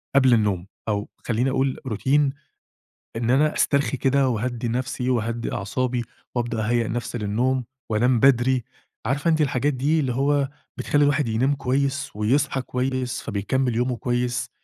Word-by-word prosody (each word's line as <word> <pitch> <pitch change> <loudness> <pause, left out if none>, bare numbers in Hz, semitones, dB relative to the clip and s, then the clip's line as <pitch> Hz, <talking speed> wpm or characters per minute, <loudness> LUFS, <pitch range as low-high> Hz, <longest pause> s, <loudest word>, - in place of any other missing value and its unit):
قبل 130 -2 +6
النوم، 100 -5 0 0.2
أو 105 0 -1 0.2
خلّيني 125 +3 +1
أقول 135 0 0
روتين 135 +5 +2 0.9
إن 115 +1 0
أنا 150 +4 +3
أسترخي 140 -1 +1
كده 135 +1 +2
وأهدّي 120 +1 -2
نفسي، 125 +1 -2
وأهدّي 115 -1 -1
أعصابي، 125 +4 -1 0.3
وأبدأ 120 -2 -1
أهيأ 120 -1 +1
نفسي 120 +1 -3
للنوم 120 +5 0 0.2
وأنام 120 +3 +2
بدري. 130 -1 +4 0.4
عارفة 140 +7 +1
أنتِ 160 -1 +2
الحاجات 145 0 +1
دي 145 +5 +1
اللي 130 -3 -1
هو 140 +1 +1 0.3
بتخلّي 145 0 +2
الواحد 145 -1 +2
ينام 130 +6 +1
كويس، 140 +2 -1
ويصحى 135 +6 +1
كويس، 125 0 -2
فبيكمل 115 +4 -1
يومه 125 +1 0
كويس؟ 120 0 -1
125 Hz, 145 wpm, -24 LUFS, 115-135 Hz, 0.9 s, قبل